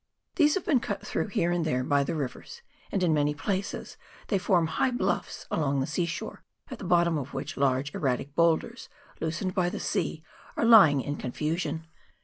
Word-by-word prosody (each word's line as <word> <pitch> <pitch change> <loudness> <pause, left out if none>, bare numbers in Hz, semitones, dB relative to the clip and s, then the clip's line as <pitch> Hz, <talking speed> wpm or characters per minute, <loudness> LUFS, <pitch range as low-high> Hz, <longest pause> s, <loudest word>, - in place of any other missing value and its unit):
These 300 -3 +4
have 385 - -2
been 285 -7 +3
cut - - -4
through - - -2
here 175 -4 0
and 175 -1 0
there 130 -5 0
by 140 +1 +2
the 140 - -3
rivers, 150 - -6 0.3
and, 195 - 0
in 165 -3 +3
many 150 0 +1
places, 195 +5 -3 0.3
they 200 - +2
form 180 -3 +2
high 160 +10 +1
bluffs 245 - -2
along 140 -3 +1
the 135 - 0
sea 170 +4 -1
shore, 165 - -6 0.3
at 255 - -6
the - - -7
bottom 170 -2 +3
of 140 0 -7
which 135 +2 -4
large 135 +1 +1
erratic 135 0 -1
boulders, 170 - +1 0.3
loosened 165 +3 -2
by 180 -2 +1
the - - -5
sea, 155 - -2 0.3
are - - +2
lying 195 - +7
in 145 +3 -4
confusion. 155 +4 -3
165 Hz, 190 wpm, -28 LUFS, 145-190 Hz, 0.3 s, lying